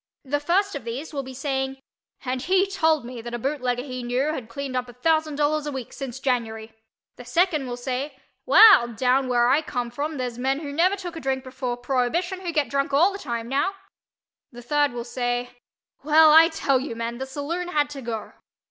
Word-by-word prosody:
The 290 +2 0
first 380 +7 +1
of 285 - -5
these 255 +8 -6
will 280 - -2
be 260 -1 -9
saying 265 0 -2 0.5
"and 255 0 -2
he 375 +6 +3
told 320 -8 +1
me 245 -1 -7
that 240 +1 -6
a - - -2
bootlegger 250 -1 -2
he 255 -2 -6
knew 255 +5 0
had 250 -7 -6
cleaned 270 +2 -5
up 250 -1 -2
a - - -11
thousand 310 +4 +1
dollars 300 +1 0
a - - -2
week 265 -4 -6
since 265 -2 -6
January." 225 -4 -2 0.4
The 245 - -9
second 320 0 +1
will 245 0 -4
say 260 +3 -4 0.3
"Well 430 - +8
down 250 +3 +1
where 240 -1 +3
I 285 +5 +4
come 245 -6 -4
from 290 +5 -3
there's 245 -2 -4
men 270 +3 0
who 285 -2 -6
never 360 +6 +3
took 360 -4 -7
a - - -5
drink 265 -2 -2
before 255 -2 -4
prohibition 270 +10 -1
who 350 -2 -3
get 300 -4 +1
drunk 275 +3 -1
all 335 +8 +5
the 395 - -6
time 235 -6 -4
now." 285 +10 0 0.8
The 240 -1 -11
third 290 +2 +2
will 240 -1 -5
say 245 0 -2 0.5
"Well, 310 +1 +6
I 325 +2 +8
tell 285 -5 +1
you, 255 -3 -5
men—the 235 +3 -4
saloon 300 +6 -4
had 295 -4 +1
to 280 -2 -7
go." 230 -3 -5
270 Hz, 210 wpm, -24 LUFS, 245-305 Hz, 0.8 s, Well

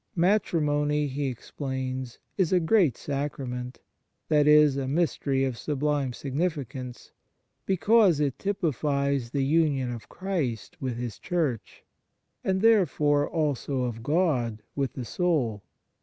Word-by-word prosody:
" - - -45
Matrimony," 150 -7 +1
he 140 0 -2
explains, 130 -1 -5
" - - -47
is 185 -5 +1
a 185 - +4
great 170 - +3
sacrament 135 -3 -4 0.5
"that 150 -2 +4
is, 150 -2 +6
a 135 -1 -2
mystery 140 -3 0
of 125 -3 -3
sub 145 -2 -3
lime 145 -3 +1
significance, 135 -3 -4 0.6
because 195 -2 +4
it 140 -3 -1
typifies 140 -8 0
the 135 +1 0
union 145 -4 +2
of 115 -2 -8
Christ 165 - -3
with 130 -3 -2
His 120 -3 -5
Church, 140 - -2 0.6
and 190 0 0
therefore 155 -10 +3
also 145 -4 -1
of 115 -2 -3
God 125 -8 0
with 140 -2 -1
the 125 - -5
soul. 135 - 0
145 Hz, 130 wpm, -27 LUFS, 130-160 Hz, 0.6 s, is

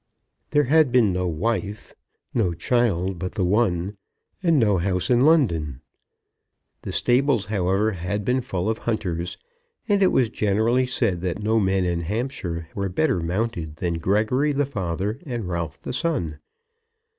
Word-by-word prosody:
There 150 0 +3
had 150 0 +4
been 115 -6 +4
no 90 0 -1
wife, 105 +4 -2 0.4
no 95 -8 +1
child 95 -5 0
but 90 +2 -4
the 95 -4 0
one, 95 -1 +1 0.4
and 170 -4 +3
no 105 -7 +3
house 90 +4 0
in 120 0 +4
London. 85 - +2 1.0
The - - -5
stables, 125 -3 +2
however, 100 +1 +1
had 100 +2 -3
been 125 +3 +1
full 95 -6 -3
of 110 0 -1
hunters: 90 -7 -2 0.5
and 205 -2 +2
it 190 - +5
was 125 -4 +2
generally 110 +5 +1
said 95 -8 0
that 95 +3 -3
no 110 +1 +2
men 95 -2 +1
in 85 -1 -1
Hampshire 90 - -3
were 100 -1 -2
better 130 - +1
mounted 85 -2 -2
than 85 +1 -2
Gregory 110 - +1
the 145 +1 +1
father 100 -2 -3
and 120 - -4
Ralph 85 -2 -3
the - - -6
son. 125 - -1
105 Hz, 155 wpm, -24 LUFS, 90-125 Hz, 1.0 s, it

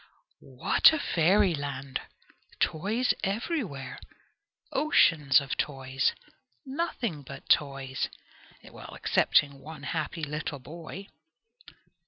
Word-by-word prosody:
What 125 - +6
a - - +1
fairyland! 155 - +1 0.6
Toys 215 +10 +1
everywhere! 195 - -3 0.7
Oceans 165 - +4
of 140 -1 -4
toys! 135 -2 0 0.5
Nothing 265 - -3
but 135 - -11
toys! 135 -2 +1 0.5
Excepting 140 -1 +1
one 150 +1 -10
happy 160 +2 -3
little 150 0 -3
boy! 165 +7 -9
155 Hz, 80 wpm, -28 LUFS, 140-200 Hz, 0.7 s, What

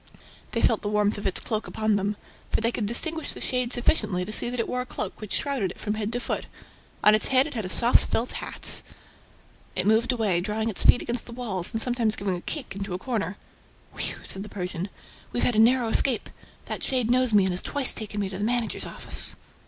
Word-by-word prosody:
They - - 0
felt - - +3
the 205 - -3
warmth 210 0 +1
of 205 - -2
its 190 - 0
cloak 215 -1 -3
upon 215 -1 0
them. 205 +1 -1 0.3
For - - 0
they 230 +1 +1
could 220 -3 -2
distinguish 320 +8 0
the - - -9
shade 250 -1 -1
sufficiently 215 - +2
to 215 - -6
see 225 - +2
that 245 0 -3
it 230 - -1
wore 250 - -2
a - - -5
cloak - - -6
which 215 - -8
shrouded 270 -10 -1
it - - -11
from 210 - -2
head 215 0 -3
to 245 - -1
foot. - - -4 0.6
On 210 - +7
its 215 - +5
head 260 0 +4
it 300 - -7
had 220 -5 -3
a - - -3
soft 235 +5 +4
felt 235 +2 -1
hat... - - +1 0.9
It 185 - -1
moved 220 +4 +3
away, 210 -8 0
drawing 215 +3 -2
its 210 - +2
feet - - +5
against 240 +1 -1
the - - -9
walls 215 -7 -2
and 225 - -1
sometimes 235 -2 +3
giving 195 -2 -2
a 175 - -7
kick 275 - -5
into 195 -2 -4
a - - -2
corner. 200 -3 -3 0.6
"Whew!" - - -2
said 190 - -4
the 210 - -8
Persian. 180 -1 -4 0.4
"We've 240 - -2
had 245 - +2
a - - +3
narrow 240 +1 +4
escape; 245 +1 +3 0.3
that - - -4
shade 250 -3 +1
knows 255 -1 +2
me 205 -2 +5
and 190 -1 +1
has 180 - -2
twice 285 -3 +3
taken 210 -1 -4
me 195 - -2
to 190 0 -6
the - - -2
managers' 235 0 0
office." - - +1
220 Hz, 240 wpm, -25 LUFS, 200-245 Hz, 0.9 s, On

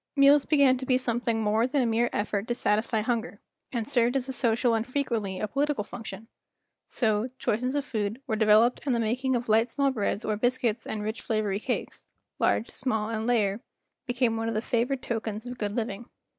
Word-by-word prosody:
Meals 280 0 +6
began 280 -4 +4
to 260 - -5
be 255 - +4
something 235 -2 -1
more 215 +3 +2
than 275 0 +1
a - - +1
mere 235 +1 +2
effort 205 0 -2
to 240 - -1
satisfy 220 0 +1
hunger, 225 -2 -2 0.3
and 230 -3 -2
served 240 +1 +2
as 265 -1 0
a 265 - -3
social 235 -1 +2
and 225 0 0
frequently 230 -8 -2
a 215 - -1
political 280 0 0
function; 225 0 -8 0.6
so, 220 -1 +1
choice 215 - 0
qualities 255 +2 -1
of 285 -1 -1
food 215 -2 -2
were 220 - -1
de¬ 215 0 +1
veloped 220 +4 +5
and 255 - +2
the - - 0
making 250 +4 0
of 240 0 -2
light 225 +2 +3
small 275 +3 +1
breads 210 -3 -2
or 215 - 0
biscuits 245 0 0
and 210 -1 -3
rich 215 +2 -3
flavory 210 -3 -1
cakes—large, 225 - -3
small, 220 -4 -1
and 220 0 -2
layer—became 235 +2 -1
one 225 0 -2
of 225 - -3
the - - +2
favored 245 +3 -1
tokens 220 -1 -3
of 245 0 -7
good 205 0 -2
living. 225 -1 -4
230 Hz, 200 wpm, -27 LUFS, 215-250 Hz, 0.6 s, Meals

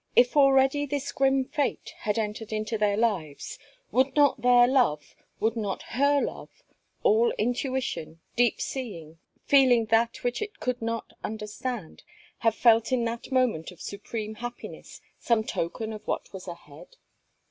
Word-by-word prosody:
If 245 +3 +5
already 275 0 +4
this 285 -1 -3
grim 270 -1 +2
fate 285 +1 -2
had 210 0 -1
entered 220 0 -3
into 215 +1 -2
their 210 -1 +1
lives, 190 -11 -2 0.3
would 260 +1 +2
not 285 -4 +4
their 245 0 +6
love, 240 - +1 0.2
would 225 +1 +1
not 210 -4 -3
her 285 +3 +3
love, - - -6 0.4
all 460 +1 +4
intuition, 245 - -2 0.2
deep 240 -2 +2
seeing, 165 - -6 0.3
feeling 255 -5 +5
that 230 +1 +2
which 245 - -1
it 420 -1 -5
could 250 -1 -2
not 230 0 -3
understand, 215 -2 -5 0.4
have 225 -1 +2
felt 230 0 +4
in 245 -2 +2
that 230 +3 -5
moment 250 -11 +1
of 180 -3 -14
supreme 215 +1 -5
happiness, 240 +2 -8 0.2
some 230 -2 +2
token 220 +3 -3
of 215 0 -10
what - - -3
was 190 -1 -8
ahead? 170 - -11
235 Hz, 145 wpm, -27 LUFS, 210-265 Hz, 0.4 s, their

